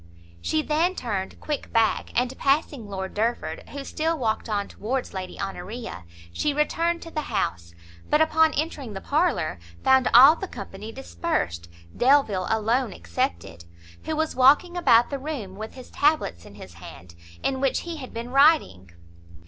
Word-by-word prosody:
She 310 Hz, -, 0 dB
then 330 Hz, +5 st, +1 dB
turned 200 Hz, -, -4 dB
quick 300 Hz, -2 st, -4 dB
back, 225 Hz, -1 st, +2 dB
and 250 Hz, +1 st, -2 dB
passing 275 Hz, -4 st, 0 dB
Lord 190 Hz, -1 st, -5 dB
Derford, 230 Hz, +3 st, -2 dB
who 280 Hz, 0 st, -6 dB
still 320 Hz, +4 st, -1 dB
walked 225 Hz, -3 st, -1 dB
on 205 Hz, -1 st, -1 dB
towards 255 Hz, +4 st, -4 dB
Lady 185 Hz, -1 st, -6 dB
Honoria, 195 Hz, -, -6 dB, 0.3 s
she 290 Hz, -, 0 dB
returned 335 Hz, +3 st, 0 dB
to 330 Hz, -, -10 dB
the 305 Hz, -2 st, -4 dB
house; 85 Hz, 0 st, -2 dB, 0.3 s
but, 300 Hz, -, +4 dB
upon 315 Hz, 0 st, +4 dB
entering 290 Hz, -7 st, -3 dB
the 195 Hz, -, -5 dB
parlour, 285 Hz, -, 0 dB, 0.2 s
found 265 Hz, -1 st, +4 dB
all 270 Hz, +7 st, +9 dB
the 385 Hz, -, -6 dB
company 205 Hz, -, -8 dB
dispersed, 85 Hz, -, -3 dB, 0.3 s
Delvile 240 Hz, -8 st, +3 dB
alone 225 Hz, +1 st, +1 dB
excepted, 85 Hz, 0 st, -4 dB, 0.4 s
who 315 Hz, -, -2 dB
was 315 Hz, 0 st, -1 dB
walking 285 Hz, +8 st, +5 dB
about 240 Hz, -9 st, +4 dB
the 280 Hz, -, -3 dB
room, 260 Hz, -10 st, -5 dB
with 215 Hz, +2 st, -8 dB
his 255 Hz, -1 st, -12 dB
tablets 290 Hz, -, +1 dB
in 100 Hz, -, -14 dB
his 95 Hz, -3 st, -11 dB
hand, 85 Hz, 0 st, -12 dB, 0.3 s
in 265 Hz, -1 st, -1 dB
which 270 Hz, -2 st, +1 dB
he 340 Hz, -1 st, -6 dB
had 260 Hz, -4 st, -8 dB
been 235 Hz, +2 st, -6 dB
writing. 275 Hz, -, +4 dB
245 Hz, 160 wpm, -25 LUFS, 195-300 Hz, 0.4 s, all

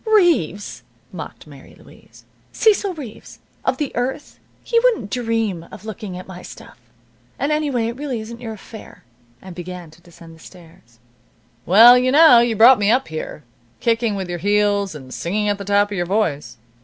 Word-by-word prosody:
"Reeves!" 335 Hz, -, +1 dB, 0.3 s
mocked -, -, -9 dB
Mary -, -, -15 dB
Louise. -, -, -19 dB, 0.3 s
"Cecil 405 Hz, -4 st, +1 dB
Reeves, 260 Hz, -9 st, -10 dB, 0.3 s
of -, -, 0 dB
The 295 Hz, -4 st, -4 dB
Earth? 265 Hz, +4 st, -4 dB, 0.2 s
He 465 Hz, -, +2 dB
wouldn't 455 Hz, -, 0 dB
dream 225 Hz, -8 st, -2 dB
of 200 Hz, -, -12 dB
looking 210 Hz, -4 st, -7 dB
at 185 Hz, -, -9 dB
my 185 Hz, -1 st, -10 dB
stuff. -, -, -13 dB, 0.6 s
And 290 Hz, -, -1 dB
anyway, 290 Hz, -6 st, 0 dB
it 235 Hz, -, -5 dB
really 275 Hz, -4 st, -4 dB
isn't 230 Hz, +2 st, -9 dB
your 225 Hz, -2 st, -6 dB
affair." 220 Hz, +1 st, -13 dB, 0.4 s
And 190 Hz, -1 st, -10 dB
began 175 Hz, -1 st, -9 dB
to 165 Hz, +2 st, -20 dB
descend 170 Hz, -1 st, -15 dB
the 160 Hz, -, -17 dB
stairs. 160 Hz, -10 st, -17 dB, 0.7 s
"Well, 235 Hz, +7 st, +8 dB
you 255 Hz, +1 st, +1 dB
know 290 Hz, -4 st, +7 dB
you 235 Hz, -1 st, +1 dB
brought 235 Hz, +3 st, +7 dB
me 205 Hz, 0 st, +1 dB
up 250 Hz, -1 st, +1 dB
here, 155 Hz, -1 st, -7 dB, 0.4 s
kicking 230 Hz, -2 st, 0 dB
with 190 Hz, -2 st, -4 dB
your 175 Hz, -1 st, -5 dB
heels, 205 Hz, -1 st, +1 dB
and 130 Hz, -3 st, -10 dB
singing 210 Hz, +5 st, -2 dB
at 205 Hz, 0 st, -1 dB
the 200 Hz, -, -7 dB
top 205 Hz, +1 st, +2 dB
of 200 Hz, -, -4 dB
your 175 Hz, 0 st, -2 dB
voice. 175 Hz, -, -2 dB
210 Hz, 180 wpm, -20 LUFS, 180-245 Hz, 0.7 s, Well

